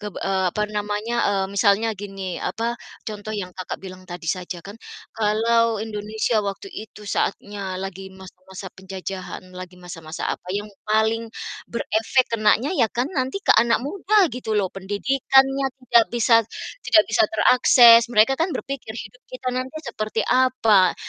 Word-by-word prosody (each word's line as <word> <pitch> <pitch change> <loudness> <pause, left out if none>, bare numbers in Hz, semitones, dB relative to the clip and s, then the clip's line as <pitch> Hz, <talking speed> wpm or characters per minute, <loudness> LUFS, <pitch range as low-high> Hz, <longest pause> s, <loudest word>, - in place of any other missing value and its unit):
keb 210 -2 -7
eee, 190 -1 -1
apa 210 - -2
namanya, 210 +3 -2
eee, 195 -1 0
misalnya 210 +2 +3
gini, 195 -3 -6
apa, 230 +1 -2 0.3
contoh 215 0 -6
yang 185 -3 -4
Kakak 185 0 -6
bilang 185 0 -9
tadi 175 -1 -8
saja 180 -1 -3
kan. 200 +2 -9 0.4
Kalau 225 +1 +2
Indonesia 215 +1 -1
waktu 200 - -5
itu 215 - -10
saatnya 200 -1 -3
lagi 190 0 -6
masa-masa 190 0 -12
penjajahan, 190 0 -7
lagi 180 0 -9
masa-masa 170 -2 -7
apa - - -9
yang 210 +1 -4 0.2
paling 220 +1 +1 0.4
berefek 235 +2 0
kenanya 225 +5 +2
ya 230 -4 +3
kan 240 +3 -1
nanti 265 +2 -1
ke - - +6
anak 235 0 +2
muda 395 +7 -1 0.2
gitu 240 -3 -3
loh. 195 -3 0
Pendidikannya 270 +7 +2 0.2
tidak 235 -2 +5
bisa 235 0 +3 0.5
tidak 320 -8 +5
bisa - - +4
terakses. 235 0 +7
Mereka 225 +2 +4
kan 330 - +2
berpikir, 265 -5 -6
hidup 235 +2 -9
kita 255 0 -5
nanti 255 +3 -4
seperti 215 -2 -3
apa? 250 -7 +3
215 Hz, 150 wpm, -22 LUFS, 195-235 Hz, 0.5 s, terakses